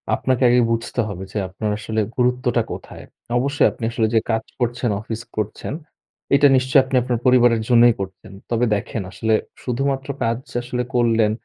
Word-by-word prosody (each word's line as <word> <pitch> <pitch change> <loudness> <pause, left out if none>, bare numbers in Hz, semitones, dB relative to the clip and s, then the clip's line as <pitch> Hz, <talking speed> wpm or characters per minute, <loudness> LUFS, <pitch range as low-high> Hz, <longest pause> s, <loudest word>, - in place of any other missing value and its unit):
আপনাকে 130 0 0
আগে 125 - +5
বুঝতে 115 +1 -2
হবে 95 -2 -6
যে, - - -4
আপনার 105 +3 -3
আসলে 110 +1 -2 0.2
গুরুত্বটা 125 -1 +1
কোথায়? - - -8 0.3
অবশ্যই 140 +3 +2
আপনি - - -11
আসলে 115 -1 +1
যে - - +6
কাজ 110 0 0 0.2
করছেন, 120 0 -1
অফিস 110 +1 -5 0.2
করছেন 110 +5 -3 0.6
এটা 145 +1 +6
নিশ্চয়ই 130 +1 +4
আপনি 130 0 -4
আপনার 120 -1 -1
পরিবারের 120 -3 +5
জন্যই 120 -1 +6
করছেন। 95 0 -8 0.2
তবে 120 +1 +1
দেখেন, 105 +2 -4
আসলে 110 0 -1 0.3
শুধুমাত্র 135 +2 -2
কাজ 115 0 +1 0.2
আসলে 125 0 -3
করলেন 115 -3 +3
120 Hz, 160 wpm, -21 LUFS, 110-125 Hz, 0.6 s, যে